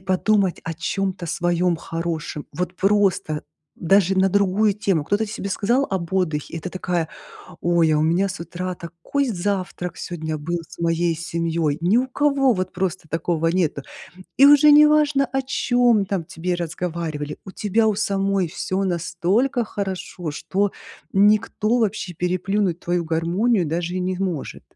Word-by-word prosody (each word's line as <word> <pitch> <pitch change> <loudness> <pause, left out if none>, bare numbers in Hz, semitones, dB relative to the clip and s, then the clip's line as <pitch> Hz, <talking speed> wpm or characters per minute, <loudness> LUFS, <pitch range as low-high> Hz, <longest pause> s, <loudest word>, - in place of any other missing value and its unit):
подумать 190 0 +1
о 165 0 -4
чём-то 185 +2 -2
своём 175 +1 +1
хорошем. 165 -2 -4
Вот 180 +1 -2
просто 190 -6 +1 0.4
даже 190 +1 +3
на 190 - +4
другую 200 +2 +2
тему. 190 -7 0
Кто-то 205 +6 0
себе 205 -1 -5
сказал 240 +8 +1
об 185 -3 -3
отдыхе, 160 -6 -1
и - - -3
ты 180 - -5
такая: 175 -3 -2 0.5
"Ой, 170 -2 +3
а 150 - +3
у - - +2
меня 170 +5 +2
с 185 -1 -6
утра 180 +2 -4
такой 170 +12 -3
завтрак 185 -3 -3
сегодня 160 -3 -4
был 170 +4 -3
с - - -14
моей 170 0 +1
семьёй". 165 -2 -1
Ни 185 +7 +3
у 260 +1 +2
кого 275 -1 +2
вот 185 0 -3
просто 185 -2 -3
такого 165 0 -1
нету. 165 -5 0 0.5
И 275 - +8
уже 290 +1 +7
неважно, 300 -1 +5
о 270 - +1
чём 245 -4 +2
там 185 -3 -1
тебе 175 +3 -3
разговаривали. 165 -3 -4
У 190 - -8
тебя 220 +3 +1
у 215 - +1
самой 195 -3 0
всё 190 +4 -2
настолько 185 +8 0
хорошо, 190 -5 -5
что 195 +6 -1 0.4
никто 210 +2 +3
вообще 215 -5 -1
переплюнуть 185 +1 0
твою 175 -1 -1
гармонию 175 +6 +1
даже 170 +3 -2
и - - -1
не 185 0 -1
может. 175 -7 -3
185 Hz, 155 wpm, -22 LUFS, 170-205 Hz, 0.5 s, И